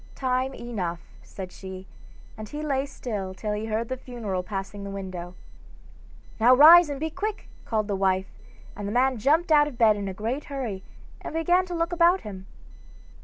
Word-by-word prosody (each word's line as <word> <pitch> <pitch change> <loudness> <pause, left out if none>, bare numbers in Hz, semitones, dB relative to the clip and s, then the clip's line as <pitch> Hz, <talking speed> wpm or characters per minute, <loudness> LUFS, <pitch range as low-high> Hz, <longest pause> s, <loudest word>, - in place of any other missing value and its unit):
'Time 260 0 0
enough,' 180 -8 -5
said 185 -2 -9
she, 190 0 -9 0.5
and 215 -2 -8
he 300 +1 -5
lay 275 -2 0
still 205 -8 -5
till 210 +2 -3
he 210 +1 -3
heard 225 +1 -1
the 260 - -3
funeral 230 -7 -4
passing 195 +1 -6
the 200 - -6
window. 185 -3 -6 1.0
'Now 245 +3 +6
rise, 325 +4 +9
and 280 -1 -4
be 320 +1 -2
quick,' 420 +5 -4 0.2
called 215 -2 -1
the 205 - -1
wife, 190 0 0 0.4
and 205 0 -5
the - - -3
man 255 +1 +2
jumped 315 +8 +2
out 295 -1 +6
of 275 -5 -8
bed 220 -3 +5
in 200 -1 -4
a 190 - -4
great 230 +8 -3
hurry, 250 -9 -4 0.4
and - - -7
began 355 +3 +2
to 355 - -4
look 335 +1 -1
about 345 +2 +4
him. 190 -2 -9
230 Hz, 185 wpm, -26 LUFS, 195-290 Hz, 1.0 s, rise